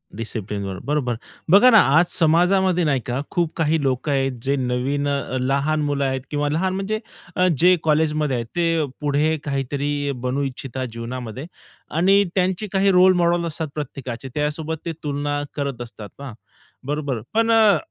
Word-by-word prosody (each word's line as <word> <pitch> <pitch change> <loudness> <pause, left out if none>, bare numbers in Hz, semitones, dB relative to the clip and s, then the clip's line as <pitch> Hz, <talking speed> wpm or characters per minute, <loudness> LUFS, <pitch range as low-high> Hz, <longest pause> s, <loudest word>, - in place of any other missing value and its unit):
डिसिप्लिनवर 100 -3 -4
बरोबर. 135 -5 0 0.4
बघा 205 +7 +8
ना, 225 -3 +8 0.2
आज 170 - +5
समाजामध्ये 180 +2 +3
नाही 145 -4 +2
का, 125 +2 -2
खूप 170 -2 0
काही 160 -1 +1
लोकं 135 +2 0
आहेत 135 -3 0
जे 140 +1 +1
नवीन 130 +3 -1
अ, 140 -2 -2
लहान 140 +4 +1
मुलं 145 -1 0
आहेत 130 -1 -1
किंवा 145 0 0
लहान 180 +5 0
म्हणजे 200 +3 -2 0.4
अ, 180 0 +3
जे 180 +1 +6
कॉलेजमध्ये 150 -2 +1
आहेत. 115 -1 -2
ते 165 -2 +1 0.2
पुढे 150 +2 +1
काहीतरी 145 +1 -2
बनू 130 +2 -1
इच्छिता 130 -1 -4
जीवनामध्ये 120 +2 -6 0.5
आणि 195 +4 +5
त्यांचे 185 +2 0
काही 195 0 +3
रोल 185 0 +6
मॉडेल 170 0 +2
असतात 160 0 -3
प्रत्येकाचे. 135 -3 -6
त्यासोबत 150 +2 -2
ते 170 - -2
तुलना 145 0 -2
करत 140 -4 -3
असतात 115 -3 -9
हां 140 -4 -7 0.5
बरोबर. 145 -5 -2
पण 225 +1 +2
अ, 220 -3 +5
145 Hz, 155 wpm, -22 LUFS, 130-170 Hz, 0.5 s, बघा